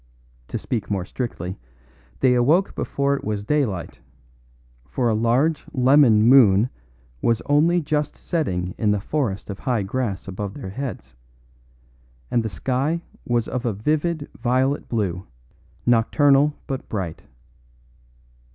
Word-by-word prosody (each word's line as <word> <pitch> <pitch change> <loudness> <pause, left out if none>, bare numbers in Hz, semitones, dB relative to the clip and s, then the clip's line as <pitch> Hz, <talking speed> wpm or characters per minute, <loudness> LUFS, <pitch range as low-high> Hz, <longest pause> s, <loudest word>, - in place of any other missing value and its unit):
To - - -3
speak 115 -5 -3
more 95 -3 -1
strictly, 95 -5 -5 0.6
they 130 - +5
awoke 150 +11 +3
before 140 0 -1
it - - -6
was 105 -1 -2
daylight; 110 - -1 0.9
for 125 - -1
a - - +2
large 125 +8 +1
lemon 130 -4 +5
moon 115 -3 +6 0.5
was 115 -1 +2
only 160 +5 +3
just 150 -1 -1
setting 90 - -2
in 105 - +2
the 105 0 +2
forest 110 -3 -2
of 95 - -8
high 120 -6 0
grass 105 -2 -3
above 100 +1 -5
their 125 -10 -7
heads, 120 - -6 1.2
and 120 - +2
the 110 - -3
sky 135 - -1 0.2
was 120 -2 +1
of 125 -1 -3
a 120 -4 0
vivid 150 - -1
violet 130 +3 0
blue, 95 -5 -2 0.6
nocturnal 140 +5 +4
but 135 -3 -5
bright. 95 -7 -4
120 Hz, 130 wpm, -23 LUFS, 105-140 Hz, 1.2 s, moon